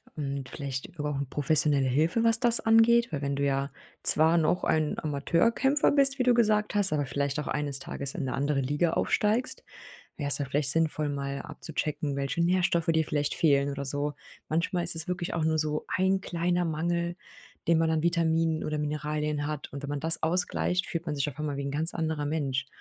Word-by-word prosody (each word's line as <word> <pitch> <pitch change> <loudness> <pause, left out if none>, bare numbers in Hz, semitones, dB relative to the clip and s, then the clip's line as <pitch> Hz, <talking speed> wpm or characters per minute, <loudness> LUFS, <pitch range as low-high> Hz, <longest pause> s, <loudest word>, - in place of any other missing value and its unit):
Und 140 -3 -4
vielleicht 135 -2 -5
über 150 0 -2
auch 140 - -3
professionelle 145 -2 +2
Hilfe, 160 - +1
was 225 -1 +4
das 240 -1 +5
angeht, 225 0 +4
weil 145 - -3
wenn 140 -1 -2
du 140 - -2
ja 140 0 0 0.3
zwar 160 +2 +6
noch 170 +3 +1
ein 155 -1 0
Amateurkämpfer 205 - +1
bist, 275 -1 +3
wie 255 - +3
du 245 - +4
gesagt 215 -3 +2
hast, 195 -5 +3
aber 145 -2 0
vielleicht 140 +1 -2
auch 150 - -5
eines 145 -2 -2
Tages 140 +1 -6
in 160 - -3
'ne 130 - -3
andere 140 0 0
Liga 145 +5 0
aufsteigst, 220 +4 0 0.5
wär's 145 -2 +3
da 145 - -2
vielleicht 140 +1 0
sinnvoll, 155 -1 0
mal 140 -1 -4
abzuchecken, 150 -2 -4
welche 140 +5 -1
Nährstoffe 175 -1 +1
dir 160 -1 +2
vielleicht 145 -1 -1
fehlen 140 -3 +2
oder 140 0 -4
so. 145 +2 -2 0.3
Manchmal 170 +2 -1
ist 170 - 0
es 160 +1 -4
wirklich 180 -1 -3
auch 165 -2 -1
nur 160 0 +1
so 155 0 -1
ein 190 +1 +2
kleiner 175 0 -1
Mangel, 170 +2 -2 0.5
den 165 -1 +4
man 165 0 +2
an 160 -1 0
Vitaminen 165 -1 +1
oder 155 0 -2
Mineralien 150 0 -2
hat 150 -2 -5
und 140 - -7
wenn 140 - -5
man 145 -1 -3
das 165 +2 0
ausgleicht, 180 +2 0
fühlt 170 0 -5
man 150 - -2
sich 140 0 -1
auf 140 - -9
einmal 150 -2 -3
wie 140 - -3
'n 140 - -3
ganz 155 +4 +1
anderer 160 -3 -2
Mensch. 135 -3 -2
155 Hz, 205 wpm, -28 LUFS, 145-170 Hz, 0.5 s, zwar